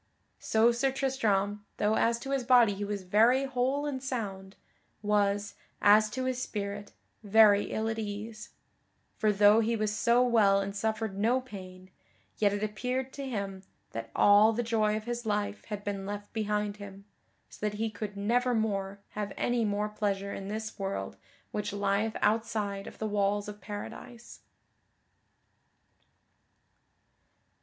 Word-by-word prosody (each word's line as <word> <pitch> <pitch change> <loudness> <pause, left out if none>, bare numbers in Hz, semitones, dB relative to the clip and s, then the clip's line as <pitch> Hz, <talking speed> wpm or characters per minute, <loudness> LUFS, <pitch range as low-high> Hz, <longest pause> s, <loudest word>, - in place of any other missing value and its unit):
So 225 +2 +3
Sir 255 +3 +1
Tristram, 210 -7 0
though 210 +1 +2
as 230 +1 +2
to 270 - -5
his 270 -2 0
body 240 -4 +5
he 200 +1 -5
was 200 -1 -3
very 225 +8 +4
whole 265 +2 0
and 275 -3 -3
sound, 200 -7 -5 0.5
was, 205 -1 +1 0.3
as 210 +1 +6
to 255 +4 -3
his 255 -1 -1
spirit, 205 -3 -5 0.3
very 210 -1 +5
ill 220 0 -2
at 225 0 -2
ease; 215 +1 -6 0.7
for 215 - +3
though 205 +2 +6
he 230 +1 +1
was 215 -1 -1
so 240 +2 +3
well 215 -5 +4
and 200 0 -4
suffered 220 0 -2
no 235 +5 +3
pain, 185 -6 -11 0.5
yet 205 -2 +4
it 205 +1 -2
appeared 250 +5 -2
to 275 -1 -5
him 200 -5 -4 0.3
that 115 0 -6
all 205 +2 +6
the 240 +2 -1
joy 215 -2 +1
of 215 - -6
his 240 +1 -4
life 205 0 -2
had 210 -2 -6
been 200 -1 -4
left 205 0 -6
behind 210 -1 -1
him, 200 -1 -10 0.4
so - - -14
that 210 -1 -1
he 225 0 -1
could 210 -2 -6
nevermore 215 -3 0
have 210 -1 -4
any 240 -1 +1
more 210 0 0
pleasure 200 -2 -2
in 195 - -6
this 220 +1 -5
world 195 0 -3 0.4
which 210 - -3
lieth 205 +2 0
outside 210 -2 0
of - - -10
the 220 - -3
walls 205 -1 0
of 210 -1 -8
Paradise. 225 +4 -8
210 Hz, 150 wpm, -30 LUFS, 200-230 Hz, 0.7 s, as